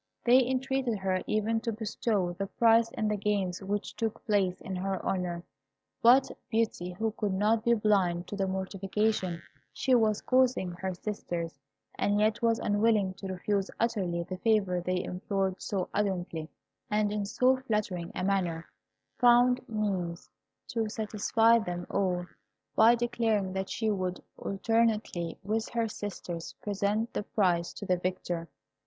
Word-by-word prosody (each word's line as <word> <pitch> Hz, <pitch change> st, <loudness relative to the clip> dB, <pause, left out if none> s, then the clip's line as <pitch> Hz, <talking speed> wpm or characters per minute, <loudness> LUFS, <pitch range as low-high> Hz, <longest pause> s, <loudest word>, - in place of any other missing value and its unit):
They 250 Hz, +2 st, +6 dB
entreated 260 Hz, -2 st, 0 dB
her 190 Hz, -1 st, 0 dB
even 220 Hz, +1 st, +1 dB
to 230 Hz, 0 st, -2 dB
bestow 210 Hz, -4 st, -1 dB
the 195 Hz, +3 st, -4 dB
prize 230 Hz, +2 st, +4 dB
in 215 Hz, -, -1 dB
the 210 Hz, -, +1 dB
games 195 Hz, -3 st, -1 dB
which 205 Hz, +2 st, -3 dB
took 225 Hz, -1 st, -3 dB
place 195 Hz, -4 st, +1 dB
in 190 Hz, -, -5 dB
her 190 Hz, 0 st, -2 dB
honour; 175 Hz, -2 st, -1 dB, 0.6 s
but 255 Hz, +3 st, +6 dB, 0.2 s
Beauty, 220 Hz, -6 st, -1 dB
who 220 Hz, +4 st, -1 dB
could 205 Hz, -3 st, -2 dB
not 215 Hz, +3 st, +2 dB
be 235 Hz, 0 st, +4 dB
blind 190 Hz, -5 st, +2 dB
to -, -, -4 dB
the 195 Hz, -1 st, 0 dB
mortification 190 Hz, -1 st, -1 dB, 0.3 s
she 265 Hz, -1 st, 0 dB
was 220 Hz, -3 st, +3 dB
causing 255 Hz, -8 st, +2 dB
her 185 Hz, +1 st, -4 dB
sisters, 175 Hz, -6 st, -4 dB, 0.4 s
and 205 Hz, 0 st, +2 dB
yet 215 Hz, +1 st, +2 dB
was 230 Hz, -1 st, +3 dB
unwilling 205 Hz, -2 st, +2 dB
to 195 Hz, +1 st, -8 dB
refuse 190 Hz, +1 st, -1 dB
utterly 190 Hz, -7 st, 0 dB
the 185 Hz, +2 st, -6 dB
favour 195 Hz, -5 st, +2 dB
they 180 Hz, +1 st, -1 dB
implored 190 Hz, 0 st, -2 dB
so 190 Hz, -3 st, -2 dB
ardently, 180 Hz, -6 st, -2 dB, 0.4 s
and 210 Hz, 0 st, +1 dB
in 210 Hz, -1 st, -1 dB
so 250 Hz, +6 st, +3 dB
flattering 210 Hz, -9 st, -2 dB
a -, -, -2 dB
manner, 180 Hz, -4 st, 0 dB, 0.5 s
found 245 Hz, 0 st, +5 dB
means 190 Hz, -6 st, -2 dB, 0.4 s
to 225 Hz, -2 st, -1 dB
satisfy 225 Hz, +1 st, +3 dB
them 175 Hz, -4 st, -4 dB
all, 180 Hz, -3 st, 0 dB, 0.5 s
by 225 Hz, +2 st, +7 dB
declaring 230 Hz, -5 st, 0 dB
that 190 Hz, 0 st, -3 dB
she 220 Hz, -1 st, 0 dB
would, 185 Hz, -2 st, -2 dB, 0.2 s
alternately 210 Hz, -5 st, 0 dB
with 215 Hz, +3 st, -1 dB
her 230 Hz, -1 st, 0 dB
sisters, 185 Hz, -5 st, -6 dB
present 205 Hz, +3 st, -1 dB
the -, -, -1 dB
prize 180 Hz, -5 st, +1 dB
to 205 Hz, -, -8 dB
the 185 Hz, -1 st, +2 dB
victor. 175 Hz, -2 st, -3 dB
205 Hz, 150 wpm, -29 LUFS, 185-225 Hz, 0.6 s, by